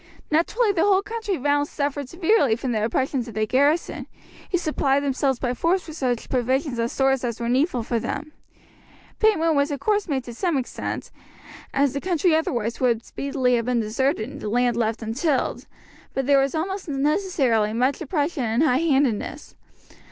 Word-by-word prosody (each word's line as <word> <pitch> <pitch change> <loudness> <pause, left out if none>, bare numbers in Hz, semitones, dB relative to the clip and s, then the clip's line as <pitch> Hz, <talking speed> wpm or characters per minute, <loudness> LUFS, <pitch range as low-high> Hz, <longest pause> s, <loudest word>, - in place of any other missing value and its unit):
Naturally 410 +8 +2
the 360 -4 0
whole 395 0 +4
country 435 -3 -3
round 290 +2 +1
suffered 285 -2 -3
severely 340 - +2
from 250 +2 -3
the 215 -2 0
oppressions 250 +2 -1
of 225 - -9
the 215 0 +1
garrison, 285 +8 +1 0.4
who 360 - +1
supplied 285 -4 +1
themselves 270 -1 0
by 245 0 -1
force 345 +8 0
with 315 - -8
such 250 -6 -1
provisions 260 +1 0
and 230 0 0
stores 270 -1 +1
as 235 -3 -3
were 235 - -2
needful 255 +1 +1
for 230 +1 -1
them. 305 +6 -4 0.9
Payment 330 -7 +3
was 280 0 +2
of 285 -2 -3
course 415 +6 +1
made 270 -5 -1
to 240 - -8
some 335 +5 0
extent, 255 - -4 0.6
as 275 -1 +2
the 280 - -3
country 355 -2 +2
otherwise 235 -7 -1
would 235 -3 +1
speedily 260 -3 0
have 230 - -2
been 250 -1 +1
deserted 225 +2 0
and 270 - -9
the 210 - -3
land 245 +1 +2
left 230 -1 -1
untilled; 260 +6 -1 0.5
but 270 - 0
there 280 0 +5
was 275 +3 -1
almost 375 +2 -3
necessarily 275 - +1
much 255 +7 0
oppression 295 -2 -1
and 230 +5 +1
high 260 -5 +3
handedness. 280 -3 0
275 Hz, 180 wpm, -23 LUFS, 245-315 Hz, 0.9 s, there